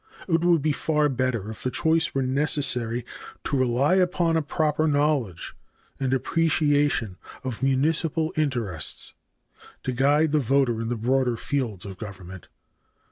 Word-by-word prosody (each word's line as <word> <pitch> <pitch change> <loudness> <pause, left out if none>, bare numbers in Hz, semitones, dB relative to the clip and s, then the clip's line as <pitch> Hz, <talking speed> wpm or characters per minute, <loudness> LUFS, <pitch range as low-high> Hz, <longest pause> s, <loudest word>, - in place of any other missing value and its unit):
It 165 -2 +1
would 170 -4 +3
be 155 - +2
far 150 0 +1
better 125 -5 -1
if 110 - -8
the 130 - -1
choice 160 +3 +1
were 135 - +1
necessary 130 -4 0 0.4
to - - -1
rely 130 +4 +2
upon 175 -2 +2
a 160 - +2
proper 155 +1 0
knowledge 145 - 0 0.5
and 135 -2 -1
appreciation 145 - +1 0.3
of 125 -3 -4
municipal 155 +4 +1
interests 120 - -2 0.7
to 130 - -1
guide 145 +5 +2
the 155 - +3
voter 130 -3 +1
in 115 - -3
the 120 - -2
broader 125 +1 +1
fields 115 -9 -2
of 95 -2 -8
government. 95 -3 -9
135 Hz, 140 wpm, -25 LUFS, 120-155 Hz, 0.7 s, would